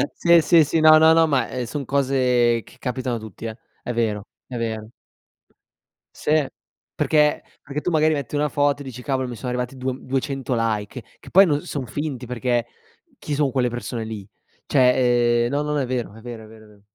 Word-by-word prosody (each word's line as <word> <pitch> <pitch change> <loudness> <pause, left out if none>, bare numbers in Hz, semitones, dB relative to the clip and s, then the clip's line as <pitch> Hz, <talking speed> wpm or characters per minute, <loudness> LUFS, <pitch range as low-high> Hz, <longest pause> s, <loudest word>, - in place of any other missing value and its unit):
Sì, 170 -1 +5
sì, 165 0 +5
sì, 150 +3 0
no, 155 0 +8
no, 160 +1 +6
no, 165 0 +4
ma, 140 -4 +1
ehm, 125 -1 -3
son 140 +3 -5
cose 125 -3 +2
che - - -18
capitano 125 -1 -3
a - - -4
tutti 110 0 -10
eh, 110 0 -5 0.2
è 120 - -4
vero, 110 -3 -1 0.2
è 125 - -6
vero. 110 -2 -4 1.3
Sì, 150 -2 +1 0.5
perché 150 -1 +2 0.2
perché 145 +1 -5
tu 180 - -1
magari 155 -1 +3
metti 140 -2 -4
una 150 +1 +1
foto 145 0 +1
e - - -8
dici: 125 -2 -8
"Cavolo 130 -1 -1
mi 120 - -6
son 125 +3 -5
arrivati 125 +1 -3
2 130 0 -2
m 130 - -10
200 135 -1 -2
like." 115 +1 -2 0.2
Che - - -14
poi 195 +2 +7
non 150 -4 0
son 140 -3 -5
finti 135 0 -4
perché 120 -1 -1 0.5
chi 150 - -4
son 140 -2 +1
quelle 125 -2 +1
persone 120 -1 -5
lì? 105 -3 -7 0.4
Cioè, 120 -3 +3
ehm, - - -4
no, 145 +1 0
no, 150 0 -1
è 135 - 0
vero, 125 -5 -3
è 110 - -13
vero, 120 -1 -8
è - - -14
vero, 110 0 -15
è - - -18
vero. 105 -1 -21
130 Hz, 210 wpm, -22 LUFS, 120-145 Hz, 1.3 s, no